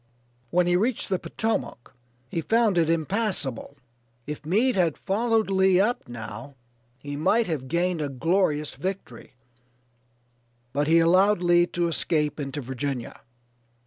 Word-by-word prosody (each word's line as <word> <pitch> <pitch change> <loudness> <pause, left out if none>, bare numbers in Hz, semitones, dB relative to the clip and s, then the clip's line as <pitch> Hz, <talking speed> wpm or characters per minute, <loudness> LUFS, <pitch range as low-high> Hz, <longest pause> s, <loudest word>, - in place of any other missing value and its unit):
When 180 +4 +2
he 175 0 +2
reached 220 +6 0
the 185 -2 0
Potomac 220 - -3 0.3
he 165 - -3
found 220 -2 +2
it 165 -1 +2
impassable. 165 - -1 0.5
If 150 0 -7
Meade 230 +9 +2
had 170 -5 +1
followed 220 +1 0
Lee 190 -1 +4
up 225 +5 0
now 115 +3 -8 0.4
he 145 +2 -7
might 215 +10 +2
have 150 -8 -3
gained 170 +2 0
a 145 - -2
glorious 150 +1 0
victory, 150 -7 -6 1.4
but 145 +1 0
he 165 +1 +5
allowed 185 +3 +4
Lee 175 0 +4
to 175 -1 -1
escape 155 -2 -1
into 140 0 -4
Virginia. 130 -1 -5
170 Hz, 135 wpm, -25 LUFS, 145-195 Hz, 1.4 s, he